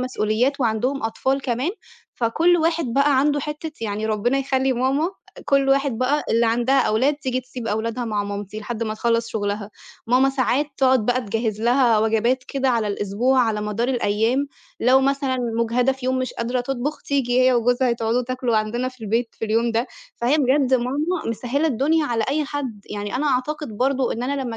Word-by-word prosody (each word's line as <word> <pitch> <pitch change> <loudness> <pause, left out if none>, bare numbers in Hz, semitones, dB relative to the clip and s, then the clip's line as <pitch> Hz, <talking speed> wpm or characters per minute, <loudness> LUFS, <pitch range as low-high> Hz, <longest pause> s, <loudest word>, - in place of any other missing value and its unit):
مسؤوليات 255 +2 0
وعندهم 245 +4 0
أطفال 265 +5 -1
كمان، 255 +5 -1 0.4
فكل 325 +10 +2
واحد 330 0 +1
بقى 280 0 +3
عنده 290 +1 +2
حتّة 300 +2 -5
يعني 215 0 -2
ربّنا 220 +5 +1
يخلّي 265 -1 +1
ماما 260 +5 +1 0.3
آآ - - -10
كل 275 -1 +2
واحد 275 -3 +2
بقى 280 +4 +1
اللي 230 +1 +3
عندها 240 +4 +2
أولاد 255 +7 +2
تيجي 260 -3 -2
تسيب 250 -2 -8
أولادها 225 +3 -2
مع 210 -3 -1
مامتي 205 +1 -5
لحد 230 +2 -4
ما 215 -1 -2
تخلّص 230 +1 0
شُغلها. 205 -1 -3 0.4
ماما 255 +3 +4
ساعات 270 +2 +1
تقعد 260 -4 +3
بقى 250 +1 +2
تجهّز 220 -1 -2
لها 240 -2 +4
وجبات 225 +4 +1
كده 270 -1 0
على 230 -4 +1
الأسبوع 205 +6 0
على 220 -3 +1
مدار 210 +3 -2
الأيام 240 +2 +1 0.3
لو 255 +2 +5
مثلًا 275 -1 0 0.2
مُجهدة 245 +3 +2
في 260 -1 -7
يوم 260 0 +1
مش 255 - -2
قادرة 245 +2 -1
تطبُخ 270 +4 -3
تيجي 255 -3 +1
هي 255 0 +5
وجوزها 245 +1 +2
تقعدوا 230 +1 0
تاكلوا 250 -2 -1
عندنا 235 +4 -1
في 255 -3 -11
البيت 230 +3 0
في - - -2
اليوم 230 +2 +1
ده. 230 +3 0 0.3
فهي 250 +6 +2
بجد 265 -1 +3
ماما 290 +8 -1
مسهّلة 250 +7 -1
الدنيا 305 +4 +1
على 230 -2 0
أي 300 +2 0
حد، 270 -7 -5
يعني 205 +1 -4
أنا 295 +4 -1
أعتقد 275 -2 -2
برضه 265 +2 +1
إن 235 - -4
أنا 275 +2 -2
لمّا 235 -3 -5
250 Hz, 185 wpm, -22 LUFS, 225-270 Hz, 0.4 s, لو